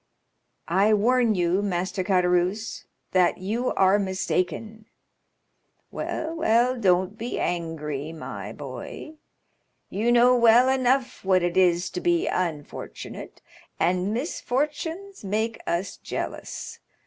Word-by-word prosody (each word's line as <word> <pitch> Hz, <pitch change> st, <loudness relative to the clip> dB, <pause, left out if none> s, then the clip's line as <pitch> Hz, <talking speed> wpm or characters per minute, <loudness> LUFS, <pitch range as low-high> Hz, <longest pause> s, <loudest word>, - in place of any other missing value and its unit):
"I 200 Hz, +5 st, +4 dB
warn 235 Hz, +1 st, +3 dB
you, 180 Hz, +2 st, +1 dB
Master 185 Hz, -1 st, -1 dB
Caderousse, 180 Hz, +2 st, +1 dB, 0.3 s
that 180 Hz, -2 st, +3 dB
you 220 Hz, +7 st, -1 dB
are 195 Hz, +1 st, +4 dB
mistaken." 195 Hz, +3 st, -2 dB, 1.0 s
"Well, 320 Hz, +1 st, -4 dB
well, 245 Hz, -3 st, +3 dB
don't 190 Hz, -1 st, +1 dB
be 235 Hz, +2 st, -3 dB
angry, 160 Hz, -4 st, -3 dB
my 105 Hz, -10 st, -7 dB
boy; 140 Hz, -, -8 dB, 0.7 s
you 220 Hz, +5 st, +1 dB
know 245 Hz, +1 st, +6 dB
well 240 Hz, +1 st, +6 dB
enough 260 Hz, 0 st, +1 dB
what 185 Hz, -2 st, +3 dB
it 175 Hz, 0 st, 0 dB
is 180 Hz, -1 st, +3 dB
to 360 Hz, -, -4 dB
be 345 Hz, -1 st, +2 dB
unfortunate; 160 Hz, -5 st, -5 dB, 0.4 s
and 180 Hz, +3 st, +1 dB
misfortunes 305 Hz, -, -3 dB
make 220 Hz, +3 st, -2 dB
us 180 Hz, +3 st, -2 dB
jealous. -, -, -6 dB
200 Hz, 110 wpm, -25 LUFS, 180-245 Hz, 1.0 s, know